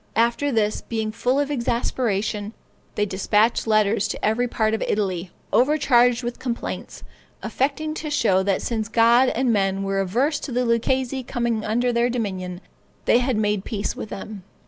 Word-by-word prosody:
After 235 +5 +2
this, 215 -3 0
being 220 -2 -3
full 250 +4 0
of 290 0 -1
exasperation, 225 -4 -1 0.4
they 210 - +1
despatched 210 +4 +1
letters 215 -1 +2
to - - -4
every 225 +3 +1
part 220 -2 0
of 220 - -1
Italy, 185 -4 -1 0.2
overcharged 250 -3 +3
with 240 0 -4
complaints, 240 -2 -5 0.4
affecting 295 +3 -1
to 310 0 -5
show 220 -10 +2
that 195 0 0
since 225 -2 -2
God 235 +3 +5
and 245 0 +2
men 195 -1 0
were 195 0 -1
averse 250 - 0
to 285 - -6
the 250 +1 0
Lucchese 260 +3 0
coming 235 -3 -2
under 240 +3 0
their 235 +1 +2
dominion, 190 -6 -3 0.4
they 240 - +5
had 250 -2 0
made 210 -2 0
peace 205 -2 -3
with 220 - -6
them. 205 0 -7
230 Hz, 165 wpm, -23 LUFS, 210-245 Hz, 0.4 s, God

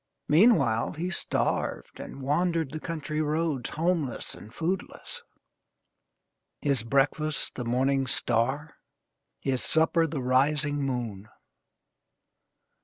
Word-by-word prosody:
Meanwhile, 150 - +4
he 175 +4 -3
starved - - -1
and 135 - -8
wandered 165 +1 +1
the 155 - -4
country 155 -1 -3
roads, 155 -4 0
homeless 160 -5 -1
and 105 - -12
foodless: 175 +8 -4 1.4
his 140 -5 +1
breakfast 140 +5 +1
the 125 - -5
morning 135 +3 +1
star, 130 +6 0 0.6
his 130 -2 -1
supper 165 +1 +3
the 145 -4 -3
rising 145 +3 +2
moon. 115 -7 -3
145 Hz, 100 wpm, -28 LUFS, 130-160 Hz, 1.4 s, Meanwhile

